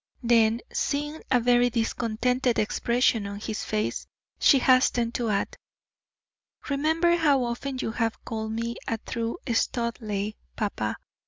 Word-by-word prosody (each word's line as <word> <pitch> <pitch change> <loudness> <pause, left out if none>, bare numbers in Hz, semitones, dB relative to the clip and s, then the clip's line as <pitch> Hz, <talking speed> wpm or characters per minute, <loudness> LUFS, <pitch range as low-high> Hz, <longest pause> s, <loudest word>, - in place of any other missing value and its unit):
Then, 230 -1 +4
seeing 295 +2 -2
a 255 -2 +4
very 245 +1 +4
discontented 235 +2 0
expression 230 0 +1
on 200 0 -6
his 215 0 -4
face, 215 0 -2 0.3
she 280 - +6
hastened 250 -2 +3
to 235 -2 -1
add: 200 -1 -1 1.2
"Remember 320 +5 +2
how 290 -6 +3
often 245 +3 -3
you 225 - -2
have 230 -1 -2
called 220 -1 -4
me 230 +1 -3
a 225 - 0
true 230 +1 -4 0.2
Studleigh, 220 -3 -1 0.2
papa. 110 - -2
235 Hz, 130 wpm, -26 LUFS, 220-255 Hz, 1.2 s, she